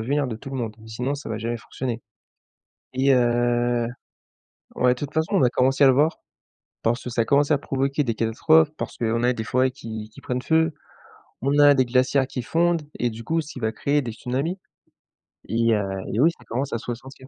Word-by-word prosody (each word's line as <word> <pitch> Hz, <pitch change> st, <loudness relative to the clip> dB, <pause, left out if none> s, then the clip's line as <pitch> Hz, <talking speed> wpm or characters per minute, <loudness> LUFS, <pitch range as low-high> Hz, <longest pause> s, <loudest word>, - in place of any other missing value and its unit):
venir 140 Hz, +5 st, 0 dB
de 110 Hz, -, -4 dB
tout 135 Hz, +5 st, -10 dB
le 135 Hz, -, -4 dB
monde, 115 Hz, -3 st, -3 dB
sinon 125 Hz, +5 st, -3 dB
ça 140 Hz, -, -7 dB
va 110 Hz, -, -3 dB
jamais 115 Hz, +2 st, -2 dB
fonctionner. 120 Hz, 0 st, -5 dB, 0.9 s
Et 135 Hz, +1 st, +3 dB
heu, 120 Hz, -1 st, +2 dB, 0.9 s
ouais, 125 Hz, 0 st, +3 dB
de -, -, -11 dB
toute 145 Hz, 0 st, -5 dB
façon 160 Hz, +4 st, 0 dB
on 185 Hz, -, +4 dB
a 125 Hz, -, +5 dB
commencé 135 Hz, +3 st, +2 dB
à -, -, +8 dB
le 130 Hz, -, +6 dB
voir, 150 Hz, +5 st, +2 dB, 0.6 s
parce 120 Hz, +2 st, +1 dB
que 125 Hz, -, -5 dB
ça 115 Hz, -1 st, 0 dB
a -, -, 0 dB
commencé 145 Hz, +4 st, +3 dB
à -, -, +4 dB
provoquer 140 Hz, +1 st, -1 dB
des 115 Hz, -3 st, -1 dB
catastrophes, 150 Hz, +8 st, +3 dB
parce -, -, -5 dB
qu'on 115 Hz, 0 st, 0 dB
a 125 Hz, -, +4 dB
des 110 Hz, -, -4 dB
forêts 130 Hz, +2 st, +2 dB
qui 110 Hz, -4 st, -7 dB
qui -, -, -15 dB
prennent 125 Hz, 0 st, -3 dB
feu, 160 Hz, +1 st, +2 dB, 0.7 s
on 140 Hz, +2 st, +1 dB
a 145 Hz, -1 st, +8 dB
des 130 Hz, -1 st, +3 dB
glaciers 130 Hz, +2 st, +2 dB
qui 130 Hz, -2 st, -5 dB
fondent 170 Hz, +3 st, +1 dB, 0.2 s
et 120 Hz, -1 st, +1 dB
du 115 Hz, +1 st, -9 dB
coup 165 Hz, +4 st, 0 dB
ce 155 Hz, -, -8 dB
qui 130 Hz, -, -7 dB
va 110 Hz, 0 st, 0 dB
créer 145 Hz, +5 st, +1 dB
des 115 Hz, -, -5 dB
tsunamis. 135 Hz, -, -3 dB, 0.9 s
Et 115 Hz, 0 st, +2 dB
heu 105 Hz, -, 0 dB, 0.3 s
et 110 Hz, -, -1 dB
oui, 155 Hz, +6 st, +6 dB
ça -, -, -18 dB
commence 130 Hz, +5 st, -3 dB
à -, -, +1 dB
se -, -, -12 dB
ressentir. 130 Hz, +2 st, -10 dB
125 Hz, 220 wpm, -24 LUFS, 115-140 Hz, 0.9 s, à